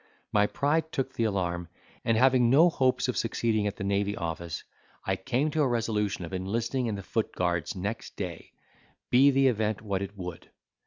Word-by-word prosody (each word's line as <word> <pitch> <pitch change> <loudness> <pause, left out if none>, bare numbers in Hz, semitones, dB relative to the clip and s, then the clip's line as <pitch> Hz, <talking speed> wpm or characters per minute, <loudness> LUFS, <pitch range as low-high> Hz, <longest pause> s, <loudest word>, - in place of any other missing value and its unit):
My 105 -1 +4
pride 160 +6 0
took 135 -1 -2
the 115 - 0
alarm, 90 -4 -1 0.4
and 115 -1 +2
having 125 -1 +5
no 155 +7 +6
hopes 130 -3 +2
of 125 - -1
succeeding 110 -2 0
at 100 - -3
the 100 - -6
Navy 100 +1 0
Office, 85 0 -4 0.4
I 95 - +1
came 130 +8 0
to 155 - +1
a 145 - +3
resolution 105 -6 -1
of 85 - -9
enlisting 115 +7 -1
in 110 - -1
the 100 - -6
foot 110 +3 -1
guards 85 -2 -1
next 105 +5 -4
day, 90 -4 -6 0.6
be 130 +3 +7
the 135 0 +3
event 110 -4 +1
what 100 -3 -1
it 100 +1 -6
would. 90 -3 -7
110 Hz, 190 wpm, -28 LUFS, 95-125 Hz, 0.6 s, be